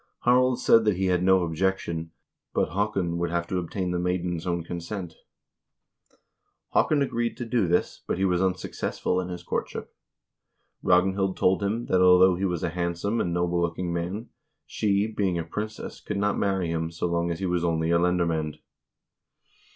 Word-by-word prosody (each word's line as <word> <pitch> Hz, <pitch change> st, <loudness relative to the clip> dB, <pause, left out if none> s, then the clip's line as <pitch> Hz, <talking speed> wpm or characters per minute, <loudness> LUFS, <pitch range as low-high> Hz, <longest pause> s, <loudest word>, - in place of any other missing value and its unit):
Harald 125 Hz, 0 st, +4 dB
said 115 Hz, -, +5 dB
that 105 Hz, -4 st, +2 dB
he 95 Hz, -, 0 dB
had 90 Hz, -, +1 dB
no 95 Hz, 0 st, +4 dB
objection, 85 Hz, -1 st, -1 dB, 0.5 s
but -, -, +2 dB
Haakon 95 Hz, -2 st, -1 dB
would 85 Hz, 0 st, 0 dB
have 85 Hz, 0 st, -1 dB
to 90 Hz, +1 st, -2 dB
obtain 90 Hz, +1 st, -3 dB
the 90 Hz, -, -1 dB
maiden's 90 Hz, -1 st, -2 dB
own 85 Hz, -1 st, -1 dB
consent. 85 Hz, +1 st, -5 dB, 1.6 s
Haakon 145 Hz, -2 st, +3 dB
agreed 120 Hz, -3 st, -2 dB
to 120 Hz, -, -4 dB
do 115 Hz, -4 st, +1 dB
this, 90 Hz, +1 st, 0 dB
but -, -, -1 dB
he 95 Hz, -, +1 dB
was 90 Hz, -1 st, +2 dB
unsuccessful 95 Hz, 0 st, -1 dB
in 90 Hz, -, -5 dB
his 90 Hz, -1 st, -6 dB
courtship. -, -, -4 dB, 0.9 s
Ragnhild 95 Hz, +1 st, +2 dB
told 95 Hz, +2 st, +3 dB
him 110 Hz, +4 st, -1 dB
that 90 Hz, -, +2 dB
although 90 Hz, 0 st, +7 dB
he 95 Hz, +3 st, -1 dB
was 90 Hz, -3 st, -2 dB
a 85 Hz, -, +1 dB
hand 85 Hz, 0 st, -2 dB
some 100 Hz, +6 st, -1 dB
and 85 Hz, -, -1 dB
noble 85 Hz, 0 st, 0 dB
looking 85 Hz, +1 st, -2 dB
man, 90 Hz, +7 st, -3 dB, 0.4 s
she, 100 Hz, -1 st, +1 dB
being 100 Hz, -5 st, -1 dB
a 85 Hz, -, -1 dB
princess, 105 Hz, +6 st, -6 dB
could 105 Hz, -, -4 dB
not 105 Hz, +1 st, +1 dB
marry 95 Hz, -4 st, 0 dB
him 80 Hz, 0 st, -1 dB
so 85 Hz, +1 st, -4 dB
long 85 Hz, 0 st, 0 dB
as 85 Hz, -, -2 dB
he 95 Hz, -, -2 dB
was 90 Hz, -1 st, 0 dB
only 80 Hz, -1 st, +1 dB
a 85 Hz, -, +4 dB
lendermand. 85 Hz, -3 st, 0 dB
90 Hz, 180 wpm, -26 LUFS, 85-100 Hz, 1.6 s, although